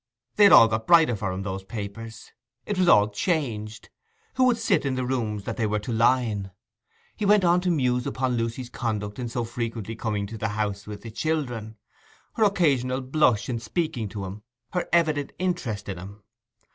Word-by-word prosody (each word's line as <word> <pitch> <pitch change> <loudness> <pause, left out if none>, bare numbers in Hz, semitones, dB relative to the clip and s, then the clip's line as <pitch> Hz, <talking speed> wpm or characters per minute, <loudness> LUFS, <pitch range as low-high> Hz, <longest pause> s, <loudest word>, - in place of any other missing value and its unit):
They 205 - +7
had 200 - +7
all 115 - +9
got 110 0 -3
brighter 165 -8 +6
for 100 -2 -3
him, 95 +1 -4
those 95 -1 -4
papers. 110 +2 -8 0.3
It 205 -3 -2
was 185 - +3
all 105 -10 +6
changed—who 160 - -3
would 245 -2 +3
sit 200 -8 +1
in 135 -2 -1
the 130 0 -2
rooms 110 -5 -2
that 115 +2 -5
they 115 -3 +1
were 105 0 0
to 105 +4 -5
line? 115 -4 +2 0.7
He - - -5
went 205 -1 +4
on 175 0 +4
to 180 - 0
muse 125 -6 +1
upon 130 -1 -1
Lucy's 115 +2 -3
conduct 105 -2 -3
in 120 -2 -3
so 120 +1 -2
frequently 115 -2 -4
coming 105 -3 -2
to 110 +2 -8
the 110 - -1
house 100 -1 -2
with 105 -1 -8
the 115 - -8
children; 120 -6 -3 0.6
her 220 - +1
occasional 135 - +2
blush 130 -4 +2
in 120 -3 -2
speaking 125 - -2
to 100 -2 -5
him; 95 +3 -8 0.3
her 180 - -2
evident 155 -4 +1
interest 140 - -2
in 95 -3 -5
him. 100 +3 -11
120 Hz, 190 wpm, -25 LUFS, 105-155 Hz, 0.7 s, all